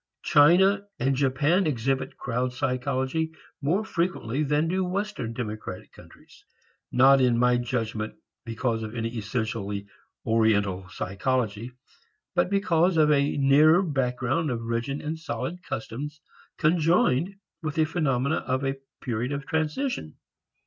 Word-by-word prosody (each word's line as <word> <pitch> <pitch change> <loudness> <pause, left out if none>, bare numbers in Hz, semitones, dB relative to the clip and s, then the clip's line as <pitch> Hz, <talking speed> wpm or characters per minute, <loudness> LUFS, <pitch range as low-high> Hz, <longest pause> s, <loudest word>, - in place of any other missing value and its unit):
China 190 +6 +5
and 135 +2 +1
Japan 145 +7 +2
exhibit 135 -1 -1
crowd 125 +1 -2
psychology 130 +4 -1 0.3
more 180 +10 +1
frequently 165 - -1
than 150 +2 +1
do 185 +3 0
western 185 - -3
democratic 110 -5 -6
countries. - - -17 0.5
Not 135 +1 +6
in 125 -2 +3
my 125 0 +4
judgment 115 -3 -3 0.3
because 115 0 -2
of 110 +1 -6
any 115 0 -3
essentially 105 -2 -3 0.4
Oriental 105 -5 +1
psychology 110 +4 -2 0.6
but - - +2
because 185 -3 +2
of 150 -1 +5
a 140 0 +2
nearer 150 +6 +5
background 135 0 0
of 115 -2 -3
rigid 115 +5 -2
and 160 +2 -4
solid 175 +2 -4
customs 145 +3 -6 0.4
conjoined 165 +1 +2 0.3
with 155 -3 -3
the 160 - +3
phenomena 150 -3 0
of 130 +1 -2
a 135 0 -1 0.2
period 125 +1 -2
of 140 -1 -4
transition. 160 - -2
135 Hz, 125 wpm, -26 LUFS, 115-160 Hz, 0.6 s, Not